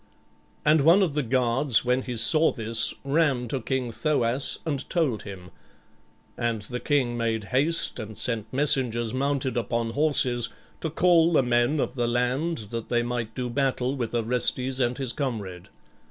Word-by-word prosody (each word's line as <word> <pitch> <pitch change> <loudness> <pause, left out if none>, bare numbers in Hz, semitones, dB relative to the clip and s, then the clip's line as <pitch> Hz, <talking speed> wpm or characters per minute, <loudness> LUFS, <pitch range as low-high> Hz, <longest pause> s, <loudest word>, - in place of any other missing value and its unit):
And 150 0 +4
one 170 +7 +5
of 165 -6 -1
the 150 - 0
guards 125 0 +2
when 125 +1 +1
he 125 -2 -5
saw 155 +7 +5
this 115 -2 +1
ran 140 -4 +1
to 135 0 -2
King 125 0 -2
Thoas 135 -1 0
and 145 -4 -3
told 150 - 0
him, 95 -3 -10 0.8
and 115 -3 -2
the 125 +3 -5
king 130 -5 0
made 115 -2 -1
haste 150 +2 +1
and 110 -1 -8
sent 115 -3 -2
messengers 125 -5 +1
mounted 135 -1 -1
upon 115 0 -2
horses, 130 -4 +1 0.3
to 160 - -3
call 170 +1 +3
the 135 - +4
men 120 +4 +1
of - - -1
the 120 -2 -1
land 125 +1 -1
that 115 -1 -5
they 120 -1 +1
might 120 -2 -4
do 125 -1 -3
battle 130 0 -1
with 120 -3 -4
Orestes 125 +3 0
and 125 -1 0
his 130 -3 -3
comrade. 105 - -5
125 Hz, 165 wpm, -25 LUFS, 115-140 Hz, 0.8 s, one